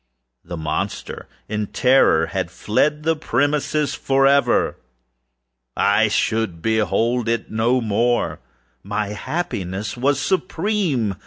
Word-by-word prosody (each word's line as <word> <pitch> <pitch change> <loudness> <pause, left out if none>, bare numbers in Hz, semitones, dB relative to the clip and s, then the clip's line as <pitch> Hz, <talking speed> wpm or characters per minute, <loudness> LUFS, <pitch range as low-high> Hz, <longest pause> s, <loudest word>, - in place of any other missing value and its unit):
The 85 0 -7
monster, 80 -1 -4 0.2
in 105 -1 -2
terror, 125 -12 +3
had 95 0 -3
fled 150 - 0
the 165 +1 +2
premises 145 +1 0
forever! 135 +1 +2 1.0
I 100 +2 +3
should 105 -4 0
behold 115 +4 0
it 115 0 -2
no 115 +4 +1
more! 115 +2 0 0.4
My 105 +1 -3
happiness 105 - -4
was 135 +3 +1
supreme! 170 - -1
115 Hz, 100 wpm, -21 LUFS, 105-140 Hz, 1.0 s, terror